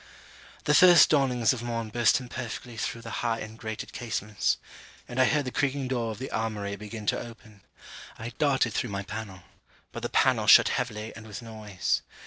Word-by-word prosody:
The 150 - +2
first 175 +1 +8
dawnings 130 -5 +3
of 125 - -5
morn 115 -2 -3
burst 120 +1 +3
imperfectly 120 -1 -7
through 115 +1 -4
the 115 - -7
high 115 -2 0
and 110 +1 -8
grated 110 -1 -6
casements; 110 -3 -1 0.5
and 125 +1 0
I - - +6
heard 145 +2 +1
the 130 - -3
creaking 135 -1 -1
door 120 -3 -1
of 110 - -5
the 130 - -6
armoury 105 -2 -2
begin 105 +1 -8
to - - +1
open; 110 -3 -12 0.6
I 115 +2 -6
darted 135 -6 +2
through 120 - -1
my 100 0 -3
pannel, 105 -3 -7 0.5
but - - -7
the - - -3
pannel - - +2
shut - - +8
heavily 110 -3 -3
and 110 0 -11
with 105 +3 -8
noise. 110 -4 -2
115 Hz, 185 wpm, -27 LUFS, 110-125 Hz, 0.6 s, first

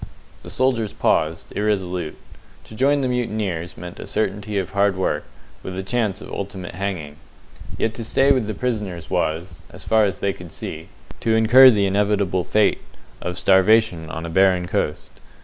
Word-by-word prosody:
The - - -10
soldiers 125 -5 0
paused, 80 +2 0
irresolute. 90 -6 -1 0.5
To - - -14
join 140 +5 +2
the 130 - 0
mutineers 105 -9 -2
meant 90 0 -9
a - - -7
certainty 105 0 -2
of 95 -1 -2
hard 100 0 +2
work, 95 - -1 0.4
with 95 0 -6
a 95 - -3
chance 105 -2 -1
of - - -10
ultimate 95 -3 -6
hanging. 85 -6 -4 0.6
Yet 110 - 0
to 115 - -6
stay 135 +5 +3
with 130 -6 +2
the 110 - -3
prisoners 100 -9 -3
was 85 0 -2
as - - -11
far 110 -1 +3
as 100 - -2
they 100 -1 0
could 90 -4 -11
see 80 +1 -7 0.3
to 110 -1 +1
incur 120 +4 +8
the 105 -5 +3
inevitable 100 -2 +1
fate 105 +2 +2 0.4
of 90 0 -4
starvation 95 -4 +3
on 80 +1 -5
a - - -5
barren 95 0 +3
coast. - - -2
100 Hz, 170 wpm, -22 LUFS, 90-110 Hz, 0.6 s, incur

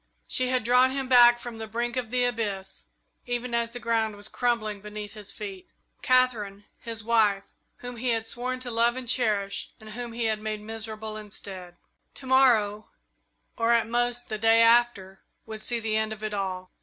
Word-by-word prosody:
She 255 - +1
had 255 -2 +1
drawn 250 +3 +5
him 265 0 -3
back 240 -1 +7
from 240 -2 -8
the 220 - -5
brink 235 +2 -2
of 250 -3 -2
the 250 +1 +1
abyss 210 -6 -3 0.4
even 245 0 -3
as 235 0 +1
the 245 +1 -7
ground 225 -2 0
was 205 +1 -5
crumbling 215 -4 -1
beneath 210 0 -7
his 210 -2 -6
feet 195 -3 -8 0.3
Katherine, 225 -6 +2
his 230 -2 -6
wife, 215 -3 +3 0.4
whom 245 -1 -6
he 250 +2 -1
had 225 -1 0
sworn 250 +3 -3
to 250 -1 -4
love 235 +1 +3
and 260 -1 -6
to 245 - +4
cherish, 205 -5 -1
and 215 -1 -11
whom 240 +1 -6
he 235 0 -2
had 215 -1 0
made 215 -1 -4
miserable 220 0 -5
instead. 190 -4 -8 0.4
To 265 - -8
morrow, 230 -6 +3 0.7
or 230 +1 +2
at 230 -1 +3
most 240 +1 0
the 215 - -4
day 225 +1 +5
after, 230 -5 +3 0.2
would 220 -1 -7
see 240 +1 -1
the 220 -1 -1
end 220 0 0
of 215 0 -7
it 215 -1 -3
all. 185 -2 -3
225 Hz, 195 wpm, -27 LUFS, 210-240 Hz, 0.7 s, back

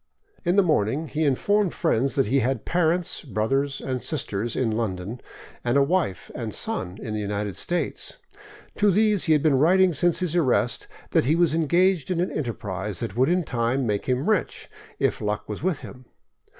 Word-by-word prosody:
In 175 -1 +1
the 200 - +5
morning 150 - 0
he 155 +1 -1
informed 200 +8 +1
friends 135 -5 +1
that 135 - +3
he 135 +6 +2
had 130 -1 -1
parents, 175 0 +1
brothers, 135 +3 -1
and 130 -2 -3
sisters 120 -6 -3
in 115 -4 0
London, 110 0 -3 0.4
and 120 +3 +2
a 140 - +5
wife 155 - -1
and - - -5
son 90 +2 -3
in 110 -4 -5
the 105 - -2
United 105 -1 -3
States. 175 0 -3 0.6
To 210 - +4
these 210 0 +3
he 160 - +4
had 150 - +2
been 145 -4 +3
writing 185 +4 +4
since 175 +3 +2
his 180 -3 -1
arrest 130 -7 +1 0.2
that - - +3
he 150 +5 +3
was 170 -2 +3
engaged 170 +1 +2
in 180 -2 0
an 180 - 0
enterprise 105 - -3
that 95 - -4
would 130 +4 +3
in 180 +1 +2
time 125 0 -1
make 105 -3 -1
him 130 +2 0
rich, 215 -5 -1 0.3
if - - 0
luck 105 0 -2
was 105 - -5
with 180 -2 -1
him. 125 0 -11
140 Hz, 190 wpm, -24 LUFS, 115-175 Hz, 0.6 s, the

